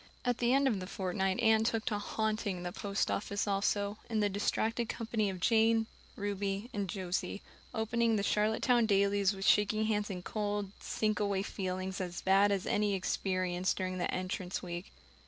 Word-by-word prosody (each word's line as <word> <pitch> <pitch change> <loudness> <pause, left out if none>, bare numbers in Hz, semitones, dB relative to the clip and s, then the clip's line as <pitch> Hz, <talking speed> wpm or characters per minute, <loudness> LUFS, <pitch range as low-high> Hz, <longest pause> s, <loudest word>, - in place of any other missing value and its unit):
At 245 -1 +1
the 240 0 +2
end 275 +1 +4
of 220 -7 +1
the 185 - -6
fortnight 190 0 -1
Anne 220 -1 +5
took 225 -1 0
to 210 -2 0
"haunting" 215 -3 -2
the 175 - -3
post 200 +2 -1
office 205 +1 -1
also, 200 +1 0
in 225 -2 0
the 205 -1 +2
distracted 220 +3 0
company 220 -3 -1
of 185 -1 -5
Jane, 225 +2 +4 0.3
Ruby, 200 +2 -3
and 200 -3 -2
Josie, 185 +1 -3 0.3
opening 230 +1 +1
the 200 - 0
Charlottetown 220 +3 +2
dailies 200 -1 +3
with 195 0 -4
shaking 215 +1 +4
hands 210 -1 0
and 180 -2 -6
cold, 205 -2 -2
sinkaway 205 -2 0
feelings 190 0 -3
as 175 -1 -4
bad 195 +2 +5
as 195 -2 0
any 205 -1 +1
experienced 185 -1 0
during 185 0 -2
the 175 - 0
Entrance 185 0 -3
week. 175 +1 -6
205 Hz, 170 wpm, -32 LUFS, 190-220 Hz, 0.3 s, Anne